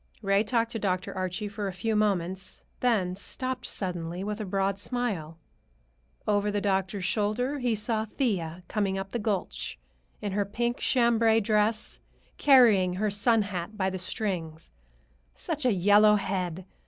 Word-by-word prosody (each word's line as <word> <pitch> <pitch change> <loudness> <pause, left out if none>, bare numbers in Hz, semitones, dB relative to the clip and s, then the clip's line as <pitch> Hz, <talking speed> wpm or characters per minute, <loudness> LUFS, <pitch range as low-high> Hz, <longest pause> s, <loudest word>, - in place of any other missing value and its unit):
Ray 195 +1 +3
talked 230 +1 0
to 225 - -3
Dr. 185 -2 -1
Archie 185 +3 -2
for 205 0 -4
a - - -2
few 215 +5 -2
moments, 190 -2 -1
then 205 -8 +1
stopped 255 +5 -3
suddenly, 175 -1 -4
with 210 +2 -3
a - - -3
broad 195 0 0
smile. 200 -10 -3 0.9
Over 205 0 +2
the 205 0 0
doctor's 195 -1 -1
shoulder 235 +8 0
he 245 -3 +1
saw 215 +1 -1
Thea 185 - -2
coming 195 -2 -1
up 195 0 -5
the 240 - -2
gulch, 205 -3 -3 0.4
in 205 -2 -3
her 205 +1 +1
pink 235 +4 -2
chambray 230 -3 +3
dress, 215 +1 0 0.4
carrying 225 -10 +6
her 210 +2 0
sun 220 +2 +3
hat 200 +1 -5
by 190 -2 0
the 185 - -4
strings. 175 - -3 0.6
Such 280 - -4
a - - +4
yellow 205 +2 +5
head! 185 -3 -2
205 Hz, 155 wpm, -28 LUFS, 185-225 Hz, 0.9 s, carrying